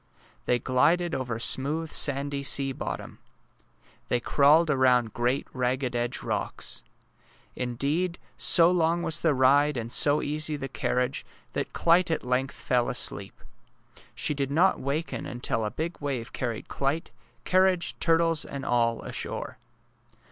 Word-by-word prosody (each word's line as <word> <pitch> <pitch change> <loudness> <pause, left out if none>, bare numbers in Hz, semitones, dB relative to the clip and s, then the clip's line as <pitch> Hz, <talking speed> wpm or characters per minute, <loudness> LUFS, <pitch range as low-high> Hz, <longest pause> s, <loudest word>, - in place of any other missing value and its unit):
They 125 - +2
glided 165 +8 +1
over 125 -3 -3
smooth 150 +7 +2
sandy 140 0 +1
sea 135 0 +1
bottom. - - -6 0.9
They 125 - 0
crawled 150 +6 +3
aroimd 125 -5 +2
great 120 +3 -1
ragged 125 0 -1
edged 120 +1 -2
rocks. - - -3 0.7
Indeed, 145 +9 -2 0.2
so 170 0 +6
long 170 -1 +1
was 160 +1 +1
the 160 -4 +1
ride 140 +2 +3
and 115 0 -5
so 145 +3 +4
easy 150 +1 -1
the 135 -2 -5
carriage 125 -1 -2 0.3
that - - -4
Clyte 170 +1 +3
at 160 - -1
length 125 +2 -1
fell 125 0 0
asleep. 110 -6 -3 0.7
She - - 0
did 140 -2 -2
not 170 +7 +2
waken 145 +5 -3
until 120 -2 -2
a 105 - -1
big 165 +8 -5
wave 135 -5 -4
carried 120 -4 -4
Clyte, 145 +5 -2 0.3
carriage, 185 -1 +2
turtles, 165 -1 +2
and 140 -1 -7
all 115 -1 0
ashore. - - -6
140 Hz, 135 wpm, -26 LUFS, 125-160 Hz, 0.9 s, so